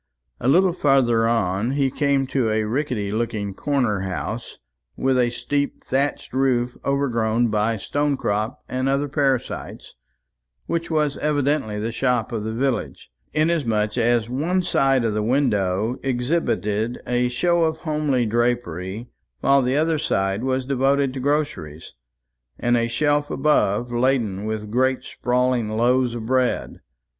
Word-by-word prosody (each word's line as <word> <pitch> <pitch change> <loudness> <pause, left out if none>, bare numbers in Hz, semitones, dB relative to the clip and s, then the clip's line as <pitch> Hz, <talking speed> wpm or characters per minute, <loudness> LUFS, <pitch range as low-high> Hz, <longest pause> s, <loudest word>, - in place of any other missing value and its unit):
A 120 - -2
little 180 +6 +4
farther 130 -8 +3
on, 115 +1 0
he 140 -2 +1
came 140 -1 +1
to 130 -3 0
a 110 0 +1
rickety 115 -3 -2
looking 105 -3 -2
corner 125 -4 0
house, 95 +5 -5 0.4
with 135 0 +1
a 120 -1 +3
steep 140 +4 -2
thatched 135 0 -2
roof 125 -2 +1
overgrown 120 -4 +1
by 110 +1 0
stonecrop 115 -4 -1
and 130 +1 -1
other 140 +1 +1
parasites, 135 -3 -2 0.7
which 170 0 -2
was 150 -3 0
evidently 145 -7 0
the 110 +2 -2
shop 125 -2 0
of 110 -3 -3
the 110 - -3
village, 125 - -2 0.2
inasmuch 125 -10 +1
as 120 -1 +2
one 165 +9 0
side 135 -7 +2
of 115 -2 0
the 105 - 0
window 110 -3 +1
exhibited 120 - -1
a 125 0 +1
show 170 +7 +2
of 160 0 -1
homely 150 -6 0
drapery, 115 -3 -1 0.3
while 140 0 +4
the 130 +1 0
other 160 0 +1
side 95 -3 0
was 130 0 0
devoted 135 0 +1
to 135 - -5
groceries, 130 - -2 0.6
and 120 0 +1
a 115 -1 +1
shelf 145 +4 +1
above 125 -5 +1
laden 120 -5 0
with 110 -1 -4
great 130 +2 +1
sprawling 125 -2 0
loaves 120 +2 +2
of 115 -2 -5
bread. 130 +1 0
125 Hz, 140 wpm, -22 LUFS, 110-140 Hz, 0.7 s, little